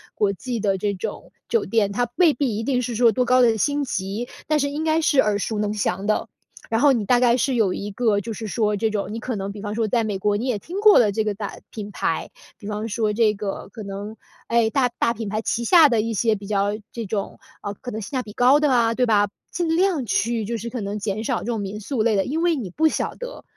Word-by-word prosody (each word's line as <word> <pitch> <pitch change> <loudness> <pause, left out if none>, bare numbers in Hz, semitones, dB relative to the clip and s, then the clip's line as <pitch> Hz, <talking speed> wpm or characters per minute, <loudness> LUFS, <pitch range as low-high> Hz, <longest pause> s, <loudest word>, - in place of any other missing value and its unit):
国 200 -2 +1
际 235 +4 -4
的 195 -2 +1
这 205 +1 0
种 185 - -6 0.2
酒 460 -3 +2
店。 215 -3 +1
它 240 +3 -1
未 345 -4 +5
必 245 -5 -1
一 225 - -3
定 250 0 +1
是 240 -1 -3
说 235 0 +5
多 250 +2 +1
高 255 +1 +4
的 225 -2 +4
星 290 +3 +1
级， 210 -1 -3 0.2
但 305 -1 +2
是 280 0 0
应 300 +2 -3
该 320 0 +2
是 295 -3 +2
耳 210 -4 +3
熟 210 +1 -2
能 210 0 0
详 195 -1 -2
的。 215 - +1 0.4
然 225 - +1
后 285 -2 +6
你 225 -4 0
大 245 +4 +4
概 240 -1 +4
是 265 +1 0
有 210 -6 +2
一 205 +2 -5
个 210 -1 +1
就 225 +3 -6
是 220 +1 -6
说 210 0 0
这 220 +2 +1
种 205 -1 -3
你 225 - -4
可 245 0 -4
能 195 0 -4
比 205 0 -9
方 210 0 -4
说 225 0 +1
在 235 +3 +1
美 210 -3 -2
国， 205 +1 +1
你 235 - -3
也 245 -4 0
听 350 - -6
过 425 0 +7
了 215 -4 +4
这 220 - -1
个 210 - 0
大 205 -1 -6
品 210 -2 -7
牌。 - - -2 0.3
比 205 - -13
方 210 +1 -3
说 220 -1 0
这 215 -1 +3
个 200 -1 -5
可 220 - -7
能， 200 +2 -6 0.3
哎， 230 -1 +3
大 255 +1 +2
大 235 - +2
品 225 -1 -5
牌 215 +2 -2
旗 235 +1 -1
下 330 -2 +7
的 230 -3 +2
一 225 +1 -2
些 220 +1 +2
比 200 -1 -9
较 200 -1 +1 0.2
这 230 -2 -4
种， 200 0 -3 0.3
嗯， 205 - -4
可 245 - -6
能 220 - -4
性 205 - -8
价 260 -3 -1
比 210 - -10
高 255 +6 +5
的 295 -2 +3
啊， 230 -2 +3
对 250 - +2
吧。 205 -3 +3 0.2
尽 330 -2 0
量 355 -5 +2
去 225 +1 0
就 230 +2 -3
是 225 +2 -6
可 245 - -5
能 200 +1 -3
减 210 0 -3
少 - - 0
这 - - -8
种 230 -3 -1
民 200 +1 -5
宿 250 +2 -2
类 220 -1 +2
的， 195 - +2
因 315 +5 -2
为 340 -1 +3
你 235 -10 -4
不 315 - +3
晓 - - -1
得， - - -8
225 Hz, 295 characters per minute, -23 LUFS, 205-250 Hz, 0.4 s, 过